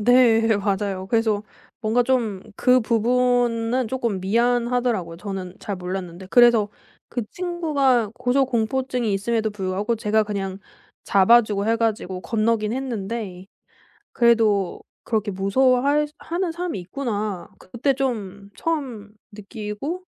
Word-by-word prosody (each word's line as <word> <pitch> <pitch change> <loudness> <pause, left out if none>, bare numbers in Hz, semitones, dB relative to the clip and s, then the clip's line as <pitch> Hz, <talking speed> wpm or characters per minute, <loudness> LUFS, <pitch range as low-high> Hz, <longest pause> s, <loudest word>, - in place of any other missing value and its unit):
네. 240 0 +5 0.2
맞아요. 195 -1 -2
그래서 220 -2 +1 0.4
뭔가 230 +2 +2
좀 235 -6 0
그 255 0 +4
부분은 240 +1 +1
조금 235 -6 -2
미안하더라고요. 235 -3 +1
저는 190 -1 -6
잘 200 - -5
몰랐는데. 180 0 -6
그래서 235 -4 +5 0.4
그 240 - -3
친구가 295 - +1
고소공포증이 250 -2 0
있음에도 220 +2 0
불구하고 205 +3 -2
제가 215 0 +2
그냥 195 -2 -4 0.5
잡아주고 205 0 +4
해 225 +1 +2
가지고 215 -5 -1
건너긴 220 0 0
했는데 220 -7 -4 0.7
그래도 220 -5 +2 0.2
'그렇게 215 -2 -1
무서워 245 +7 +2
할 295 +2 +2
하는 345 +1 -2
사람이 340 - -4
있구나.' 210 -2 -4
그때 240 +8 -1
좀 205 -7 -3
처음 255 -11 -3 0.2
느끼고 210 - -6
225 Hz, 285 characters per minute, -23 LUFS, 200-250 Hz, 0.7 s, 네